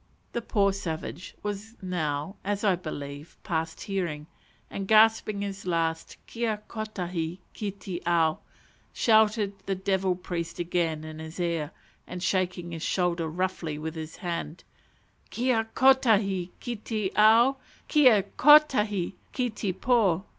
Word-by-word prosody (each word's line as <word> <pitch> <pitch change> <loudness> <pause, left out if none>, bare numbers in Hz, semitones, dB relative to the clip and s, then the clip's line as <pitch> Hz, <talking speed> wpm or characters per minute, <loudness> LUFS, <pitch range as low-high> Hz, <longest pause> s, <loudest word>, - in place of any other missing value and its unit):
_" - - -40
The 235 - -2
poor 200 -3 +2
savage 175 -1 -5
was 210 +2 -5
now, 175 -2 -2
as 205 +1 -2
I 195 -3 +4
believe, 145 -3 -7
past 160 -1 -3
hearing, 175 -7 -3 0.4
and 195 -1 -5
gasping 215 -1 +4
his 195 -1 -6
last 165 -2 -1
"Kia 225 -3 -3
kotahi 180 -6 -4 0.2
ki 210 - -3
te 190 -2 -6
ao!" 165 -2 +2 0.5
shouted 215 -2 +3
the 195 - 0
devil 190 -1 0
priest 175 -2 -5
again 170 -3 -1
in 155 0 -8
his 160 +2 -8
ear, 170 -4 -1 0.4
and 180 0 -6
shaking 180 -2 -1
his 165 -1 -6
shoulder 175 -2 0
roughly 170 -2 -2
with 160 +1 -5
his 160 -1 -7
hand 170 -2 -5 0.7
"_Kia 235 -2 0
kotahi 215 -9 +4
ki 240 -2 -4
te 215 -2 -3
ao! 230 +5 +6 0.3
Kia 255 -10 +5
kotahi 210 - +4 0.2
ki 250 -2 -1
te 210 -2 -2
po! 195 -4 +2
190 Hz, 135 wpm, -27 LUFS, 170-215 Hz, 0.7 s, ao